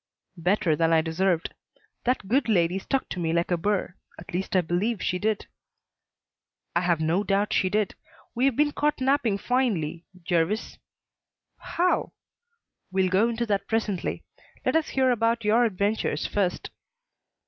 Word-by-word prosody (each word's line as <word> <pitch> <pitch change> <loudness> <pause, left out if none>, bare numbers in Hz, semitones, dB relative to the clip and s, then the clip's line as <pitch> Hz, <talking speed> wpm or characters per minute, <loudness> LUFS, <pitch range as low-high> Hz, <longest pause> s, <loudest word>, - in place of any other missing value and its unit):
"Better 175 -1 +2
than 165 +1 +2
I 160 -1 +5
deserved. 165 +1 0 0.5
That 250 -5 0
good 250 +3 +1
lady 180 -2 +2
stuck 270 +7 -1
to 180 - -4
me 165 -1 0
like 170 +1 0
a - - +4
burr 185 +1 -1 0.2
at 175 +3 -11
least 190 +2 -2
I 185 - +5
believe 185 +6 -1
she 180 0 -1
did." 215 0 -1 1.3
"I 170 - +3
have 175 -2 +1
no 165 +5 +1
doubt 200 0 +1
she 185 - +2
did. 210 0 0 0.4
We 245 +3 +1
have 275 -3 +2
been 295 +2 +3
caught 295 0 0
napping 260 -6 +2
finely, 195 - -1 0.2
Jervis." 175 +5 -1 0.8
"How?" 360 +1 0 0.8
"We'll 190 0 +2
go 200 +5 +3
into 235 0 -1
that 205 -3 -1
presently. 215 -5 -1 0.4
Let - - +1
us 320 -1 +2
hear 260 -1 +2
about 230 -1 +1
your 230 +3 +4
adventures 205 0 -1
first." 190 -3 -1
200 Hz, 155 wpm, -26 LUFS, 175-230 Hz, 1.3 s, I